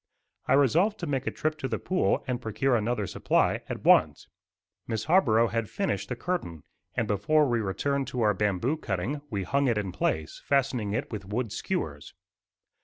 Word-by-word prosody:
I - - +3
resolved 165 - +3
to - - -2
make 135 -3 -2
a - - +1
trip 155 0 -2
to 135 - -2
the - - -2
pool 185 0 0
and 125 -2 -2
procure 120 +4 +1
another 110 -1 0
supply - - +1
at - - -5
once. - - +4 0.6
Miss 110 -2 -2
Harborough 120 -10 +4
had 115 -2 -2
finished 200 -1 -2
the - - -2
curtain, 85 - -3 0.3
and 115 - 0
before 140 +10 +2
we 120 -2 +1
returned 135 +7 -1
to 125 -2 -3
our 105 -2 +4
bamboo 105 - 0
cutting 135 - -3
we 100 -4 -2
hung 140 +8 +1
it 115 -3 +2
in 100 -3 -2
place, 80 -3 -2
fastening 130 -7 0
it 130 +6 -3
with 105 -4 -5
wooden 110 +3 -3
skewers. - - -4
120 Hz, 180 wpm, -28 LUFS, 105-140 Hz, 0.6 s, once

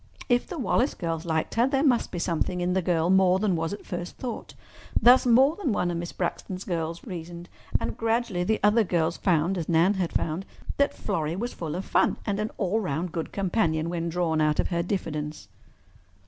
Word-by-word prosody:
If 245 0 +2
the 355 - -6
Wallace 260 0 +1
girls 165 -1 -3
liked 160 -1 -1
her, 235 +2 +3
there 270 0 +1
must 250 -6 +3
be - - -6
something 170 +1 -1
in 180 +1 0
the 190 - +2
girl 170 -1 +1
more 190 -1 +5
than 195 -2 +1
was 165 +1 -2
at 205 - -7
first 175 -1 -6
thought—thus 245 0 +1
more 265 +6 +5
than 310 - -1
one 175 -3 0
of 170 - -2
Miss 170 0 -4
Braxton's 185 +1 -4
girls 165 -2 -3
reasoned. 175 0 -7 0.3
And - - -3
gradually 225 -5 0
the 220 +4 +1
other 210 +2 +5
girls 170 -3 0
found, 175 +1 +1
as 165 - -5
Nan 170 +4 +4
had 185 -4 -2
found, 165 +4 -2 0.3
that 280 - +2
Florrie 165 -6 -2
was 235 +6 -3
full 160 -2 -5
of 185 - -4
fun - - +2
and 205 -1 -1
an 215 +1 -1
all 200 +2 0
round 175 -3 -2
good 165 -1 -4
companion 170 -5 0
when 170 -1 -2
drawn 165 -2 0
out 150 -1 +2
of - - +1
her 170 -2 0
diffidence. 155 -5 -4
180 Hz, 205 wpm, -26 LUFS, 165-215 Hz, 0.3 s, more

